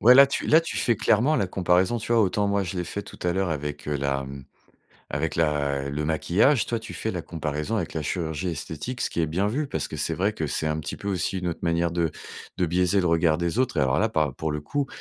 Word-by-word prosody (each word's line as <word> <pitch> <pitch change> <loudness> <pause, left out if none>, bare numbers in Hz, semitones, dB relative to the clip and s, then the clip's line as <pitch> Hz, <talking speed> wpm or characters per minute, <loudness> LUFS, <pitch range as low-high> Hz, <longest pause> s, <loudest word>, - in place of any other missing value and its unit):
Ouais, 125 +3 +8
là, 140 0 +9
tu - - -2
là, 160 +2 +6
tu 165 - -5
fais 120 - +2
clairement 120 +8 +3
la 100 -9 +1
comparaison, 90 +4 +2
tu 115 - -3
vois, 115 - +5
autant, 100 +1 +1
moi, 100 0 +1
je 95 0 -4
l'ai 90 - -1
fait 100 +4 -5
tout - - -12
à 90 - +1
l'heure 95 0 0
avec, 75 -1 -4
heu, 75 - 0
la 70 0 -1
mmh, 70 0 -8 0.7
avec - - -1
la 70 -3 0
le 75 +2 -2
maquillage. 100 - +3
Toi, 115 - -1
tu 115 +1 -9
fais 110 - -2
la 90 - -3
comparaison 75 +5 -3
avec 90 -7 -2
la 80 - -2
chirurgie 80 +2 -2
esthétique, 80 - -5
ce - - -1
qui 85 - -2
est 80 - +2
bien 90 +7 0
vu, 145 +7 -1
parce - - -3
que - - -6
c'est 80 +3 0
vrai 100 +5 +1
que 80 -7 -3
c'est 75 +2 -2
un 75 0 0
petit 70 -2 -5
peu 100 - -6
aussi 95 0 -1
une 90 - -2
autre 85 - -3
manière 85 0 +1
de 85 -2 0 0.5
de 90 - +1
biaiser 90 +3 +2
le 90 - 0
regard 80 -1 +3
des 85 +5 -1
autres. 130 0 +1
Et - - +4
alors, 65 0 +2
là, 110 - +2
par 75 -9 0
pour 80 +1 -2
le 75 - -3
coup, 140 - -1
85 Hz, 270 wpm, -25 LUFS, 75-105 Hz, 0.7 s, là